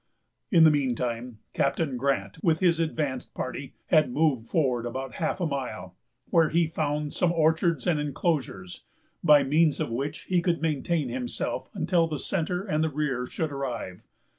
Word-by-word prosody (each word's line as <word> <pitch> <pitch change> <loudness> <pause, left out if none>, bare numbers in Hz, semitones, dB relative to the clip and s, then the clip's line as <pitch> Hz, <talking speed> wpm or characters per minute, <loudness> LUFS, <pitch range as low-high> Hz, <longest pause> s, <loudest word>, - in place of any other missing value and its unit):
In 170 -7 +6
the 160 - +8
mean 135 -4 +1
time, 120 -1 -4 0.2
Captain 150 -6 0
Grant, 120 -7 -1
with 160 -2 +3
his 170 -3 +3
advanced 155 -4 -2
party, 135 +1 -5
had 155 -5 +4
moved 135 -5 +1
forward 125 -7 +1
about 130 +2 -5
half 160 - 0
a 175 - 0
mile, 125 - -4 0.4
where 165 -2 +4
he 170 +1 +3
found 150 -2 -2
some 180 -2 +2
orchards 160 -2 +2
and 170 -4 +2
enclosures, 140 - -2 0.4
by 150 -2 +7
means 150 +2 +3
of - - -2
which 140 +6 -3
he 180 -2 +1
could 170 -1 +1
maintain 155 -2 0
himself 125 0 -3
until 170 -2 +2
the 155 -2 -3
centre 180 +5 -2
and 160 -5 0
rear 135 -5 -1
should 160 +2 -3
arrive. 120 -9 -4
150 Hz, 165 wpm, -27 LUFS, 130-165 Hz, 0.4 s, the